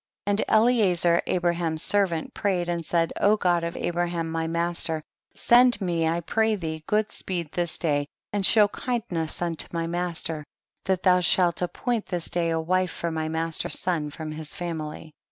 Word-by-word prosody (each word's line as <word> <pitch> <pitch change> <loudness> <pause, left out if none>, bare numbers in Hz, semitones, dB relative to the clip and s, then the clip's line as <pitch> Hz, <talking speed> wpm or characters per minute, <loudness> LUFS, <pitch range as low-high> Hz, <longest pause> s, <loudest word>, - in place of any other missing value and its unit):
36. 205 - +1
And 205 +2 0
Eliezer, 195 -7 +3
Abraham's 170 -3 0
ser 205 -1 +3
vant, 165 -3 -5
prayed 185 -4 0
and 170 -1 -2
said, 165 +1 0
God 180 -5 +3
of 170 0 -4
Abraham 170 -1 -2
my 165 0 -1
master; 170 -1 -1 0.3
send 245 -1 +5
me 170 -4 0
I 165 +1 0
pray 220 +5 +1
thee 160 -4 -5
good 210 0 +1
speed 170 -5 -4
this 175 -2 0
day 145 -3 0 0.3
and 205 -1 0
show 210 +1 +6
kindness 200 -9 -3
unto 170 -2 -1
my 165 -1 -2
master, 170 -2 -3 0.4
that 190 -2 0
thou 180 -1 +5
shall 180 0 +3
appoint 220 +6 -2
this 175 -3 -3
day 170 -1 0
a 165 0 0
wife 185 +3 +1
for 170 0 -4
my 160 -1 -2
master's 160 0 -1
son 165 -5 -1
fi'om 155 +1 -6
his 155 -1 -6
family. 160 -2 -5
170 Hz, 170 wpm, -25 LUFS, 165-185 Hz, 0.4 s, show